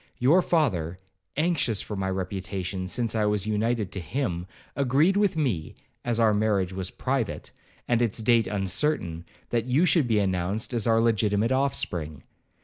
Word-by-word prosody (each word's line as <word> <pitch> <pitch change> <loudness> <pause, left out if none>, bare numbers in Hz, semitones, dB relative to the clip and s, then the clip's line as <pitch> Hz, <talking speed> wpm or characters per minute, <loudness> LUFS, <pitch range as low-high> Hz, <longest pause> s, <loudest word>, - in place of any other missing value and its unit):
Your 150 +9 +4
father, 95 - 0 0.4
anxious 155 - +1
for 105 - -4
my 95 -1 -2
reputation, 95 0 -3
since 115 +3 -1
I 110 -2 +1
was 105 -2 0
united 110 -1 0
to 95 - -4
him, 90 - -3 0.3
agreed 140 +7 +3
with 205 -3 +2
me, 110 - -1 0.3
as 120 -1 0
our 110 -2 +4
marriage 105 -3 +1
was 95 -1 -4
private, 130 -4 -3 0.4
and 120 -1 +2
its 115 -4 0
date 115 0 +3
uncertain, 95 - -1 0.3
that 115 -1 0
you 135 +8 +3
should 165 -7 +3
be 110 -2 +2
announced 95 +4 -1
as 115 -2 +1
our 115 0 +4
legitimate 110 0 +2
offspring. 85 - -1
110 Hz, 155 wpm, -26 LUFS, 95-125 Hz, 0.4 s, Your